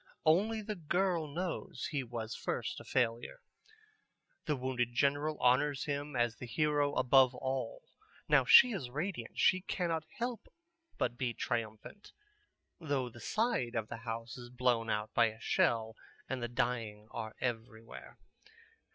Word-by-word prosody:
Only 210 Hz, +8 st, +3 dB
the 215 Hz, +1 st, -3 dB
girl 175 Hz, -1 st, 0 dB
knows 170 Hz, +4 st, -4 dB
he 145 Hz, -3 st, -1 dB
was 115 Hz, -2 st, -5 dB
first -, -, -3 dB
a -, -, -10 dB
failure. 120 Hz, -1 st, -1 dB, 1.1 s
The 150 Hz, -, +1 dB
wounded 125 Hz, -2 st, -2 dB
general 145 Hz, +3 st, +1 dB
honors 135 Hz, +3 st, +3 dB
him 145 Hz, -1 st, -3 dB
as 120 Hz, -2 st, +1 dB
the 125 Hz, -, -7 dB
hero 145 Hz, +1 st, +1 dB
above 130 Hz, 0 st, +5 dB
all. 135 Hz, -, -3 dB, 0.4 s
Now -, -, +5 dB
she 250 Hz, -, +8 dB
is 150 Hz, -, -4 dB
radiant, 150 Hz, -, -4 dB
she 185 Hz, 0 st, +4 dB
cannot 170 Hz, -4 st, -2 dB
help 240 Hz, -1 st, -4 dB, 0.5 s
but 120 Hz, -1 st, -1 dB
be 120 Hz, -3 st, -1 dB
triumphant, 115 Hz, -, -4 dB, 0.7 s
though 140 Hz, -6 st, -1 dB
the 120 Hz, -, -13 dB
side 215 Hz, -, 0 dB
of 110 Hz, -2 st, -2 dB
the -, -, -5 dB
house 115 Hz, +2 st, -6 dB
is 120 Hz, 0 st, -9 dB
blown 120 Hz, -2 st, +1 dB
out 105 Hz, 0 st, -2 dB
by 120 Hz, -1 st, +5 dB
a 110 Hz, 0 st, -7 dB
shell 110 Hz, -1 st, +1 dB, 0.3 s
and 130 Hz, -2 st, -3 dB
the 120 Hz, -, -1 dB
dying 115 Hz, -3 st, -2 dB
are 110 Hz, -1 st, -5 dB
everywhere. 115 Hz, -2 st, -5 dB
125 Hz, 145 wpm, -33 LUFS, 115-155 Hz, 1.1 s, she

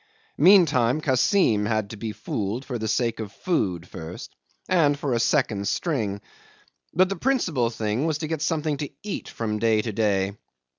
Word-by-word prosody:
Meantime 155 Hz, -, +5 dB
Kassim 130 Hz, -, +2 dB
had 110 Hz, -2 st, -1 dB
to -, -, -6 dB
be 110 Hz, +1 st, -4 dB
fooled 105 Hz, +3 st, -4 dB
for 125 Hz, -3 st, -4 dB
the 110 Hz, -, -2 dB
sake 115 Hz, 0 st, 0 dB
of 105 Hz, -3 st, -5 dB
food 95 Hz, -, -1 dB
first 80 Hz, +1 st, -9 dB, 0.3 s
and 150 Hz, -6 st, +3 dB
for 140 Hz, -3 st, -2 dB
a 120 Hz, -, +1 dB
second 115 Hz, -7 st, +1 dB
string. 110 Hz, -, -1 dB, 0.7 s
But 185 Hz, +2 st, +4 dB
the 195 Hz, -, -3 dB
principal 170 Hz, -, +1 dB
thing 115 Hz, +5 st, -1 dB
was 155 Hz, -2 st, 0 dB
to 155 Hz, 0 st, -4 dB
get 160 Hz, -1 st, -3 dB
something 155 Hz, -1 st, 0 dB
to 145 Hz, -1 st, -4 dB
eat 205 Hz, -2 st, -5 dB
from 105 Hz, -2 st, -3 dB
day 110 Hz, -1 st, +2 dB
to 115 Hz, -, -3 dB
day. 100 Hz, -2 st, +1 dB
120 Hz, 170 wpm, -25 LUFS, 105-155 Hz, 0.7 s, Meantime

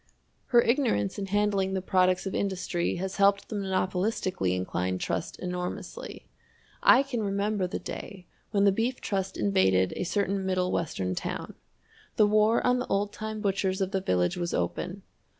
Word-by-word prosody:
Her 240 Hz, -1 st, +5 dB
ignorance 235 Hz, -, +1 dB
in 195 Hz, -, -3 dB
handling 200 Hz, -1 st, +1 dB
the -, -, +1 dB
products 185 Hz, -1 st, +2 dB
of 195 Hz, -, -3 dB
industry 180 Hz, -3 st, -1 dB
has 190 Hz, +2 st, -4 dB
helped 200 Hz, 0 st, +3 dB
the 220 Hz, -, -4 dB
monopolistically 185 Hz, -, 0 dB
inclined 90 Hz, 0 st, -2 dB
trust 85 Hz, -1 st, -3 dB
enormously. 180 Hz, 0 st, -5 dB, 0.6 s
I 260 Hz, -, +7 dB
can 260 Hz, -5 st, -3 dB
remember 200 Hz, -1 st, 0 dB
the -, -, -3 dB
day 190 Hz, -3 st, -8 dB, 0.2 s
when 200 Hz, -1 st, +2 dB
the 200 Hz, -, +6 dB
Beef 230 Hz, +6 st, -1 dB
Trust 195 Hz, -2 st, -2 dB
invaded 95 Hz, -2 st, +2 dB
a -, -, -2 dB
certain 195 Hz, +1 st, 0 dB
Middle 185 Hz, -1 st, 0 dB
Western 95 Hz, -, -1 dB
town. -, -, -4 dB, 0.6 s
The 215 Hz, -, +5 dB
war 215 Hz, +2 st, +3 dB
on 250 Hz, 0 st, +3 dB
the 250 Hz, -, -3 dB
old 205 Hz, +1 st, 0 dB
time 215 Hz, 0 st, -5 dB
butchers 195 Hz, -1 st, 0 dB
of 190 Hz, -1 st, -1 dB
the 190 Hz, -2 st, 0 dB
village 90 Hz, -, +1 dB
was 175 Hz, -1 st, -2 dB
open. 85 Hz, 0 st, -3 dB
190 Hz, 165 wpm, -28 LUFS, 180-205 Hz, 0.6 s, I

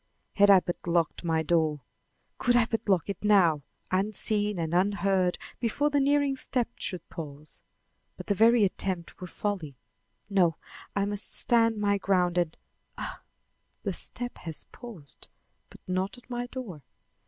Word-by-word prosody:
Had 205 Hz, 0 st, +5 dB
I 195 Hz, -2 st, +8 dB
but 175 Hz, 0 st, -5 dB
locked 170 Hz, -1 st, 0 dB
my 160 Hz, -1 st, +1 dB
door! 155 Hz, -3 st, +1 dB, 0.6 s
Could 245 Hz, -1 st, +3 dB
I 240 Hz, -2 st, +5 dB
but 225 Hz, -2 st, -3 dB
lock 185 Hz, -4 st, +3 dB
it 200 Hz, -1 st, -5 dB
now, 185 Hz, -8 st, +4 dB, 0.3 s
unseen 205 Hz, +1 st, +1 dB
and 165 Hz, -1 st, -2 dB
unheard 190 Hz, -1 st, +2 dB, 0.2 s
before 285 Hz, +6 st, 0 dB
the 290 Hz, -, +3 dB
nearing 285 Hz, 0 st, +2 dB
step 250 Hz, -2 st, 0 dB
should 180 Hz, -3 st, -2 dB
pause! 150 Hz, -1 st, -9 dB, 0.6 s
But -, -, -8 dB
the 205 Hz, -, +1 dB
very 225 Hz, +2 st, +5 dB
attempt 185 Hz, -3 st, -2 dB
were 180 Hz, -, -5 dB
folly; 175 Hz, -8 st, -4 dB, 0.5 s
no, 180 Hz, -5 st, +2 dB, 0.4 s
I 200 Hz, 0 st, +1 dB
must 205 Hz, 0 st, +1 dB
stand 230 Hz, -2 st, +3 dB
my 200 Hz, -1 st, +1 dB
ground 180 Hz, -2 st, +2 dB
and 170 Hz, -2 st, -1 dB, 0.4 s
Ah! -, -, -6 dB, 0.6 s
the -, -, -1 dB
step 245 Hz, 0 st, -5 dB
has 160 Hz, -3 st, -6 dB
paused, 205 Hz, -, -10 dB, 0.4 s
but -, -, -16 dB
not 185 Hz, +5 st, -2 dB
at 245 Hz, 0 st, -17 dB
my 245 Hz, 0 st, -3 dB
door. 235 Hz, -, -7 dB
195 Hz, 155 wpm, -28 LUFS, 175-225 Hz, 0.6 s, I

